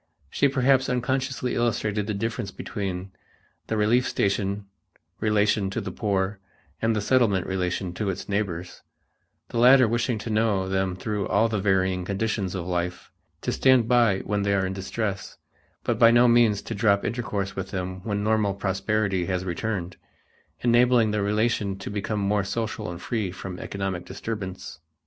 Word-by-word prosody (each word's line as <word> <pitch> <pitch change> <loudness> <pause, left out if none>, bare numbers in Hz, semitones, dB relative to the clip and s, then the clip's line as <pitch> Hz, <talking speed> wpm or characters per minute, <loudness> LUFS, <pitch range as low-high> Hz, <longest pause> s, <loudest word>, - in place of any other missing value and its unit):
She 140 - +3
perhaps 135 -1 +2
unconsciously 130 0 -1
illustrated 105 -3 0
the 105 - -2
difference 115 +1 -3
between 95 -2 -5 0.6
the 110 - -1
relief 115 +4 +3
station 100 0 -1 0.5
relation 105 -2 +2
to 100 - -3
the 100 -3 -5
poor 100 -1 -1 0.4
and 115 0 +2
the 105 - 0
Settlement 105 -5 +2
relation 90 -1 -2
to 100 +2 -2
its 95 0 -4
neighbors, 90 -4 -3 0.7
the 115 - -2
latter 125 +1 +7
wishing 120 +1 0
to 110 +2 -5
know 105 -3 +1
them 95 -1 0
through 100 +1 -3
all 110 +3 +3
the 110 -2 -1
varying 95 -2 +1
conditions 100 0 -2
of 90 -2 -3
life, 90 0 -3 0.3
to - - -1
stand 130 -4 +4
by 115 -5 +3
when 105 0 -1
they 100 0 +1
are 95 -1 +1
in 95 - -2
distress, 100 +1 -4 0.5
but - - -1
by 115 - +8
no 120 +1 +6
means 115 -4 +4
to - - -5
drop 100 -1 +2
intercourse 105 -4 -2
with 95 0 -4
them 95 0 -4
when 105 -2 -2
normal 105 -2 +1
prosperity 100 -1 0
has 95 -1 -1
returned, 90 -1 -3 0.6
enabling 120 -2 +4
the 105 -1 0
relation 105 -1 0
to 95 - -7
become 105 +1 -2
more 100 0 +1
social 110 +1 -3
and 85 0 -7
free 110 -5 -1
from 90 0 -7
economic 95 -3 -4
disturbance. 95 -3 -6
105 Hz, 165 wpm, -25 LUFS, 95-115 Hz, 0.7 s, by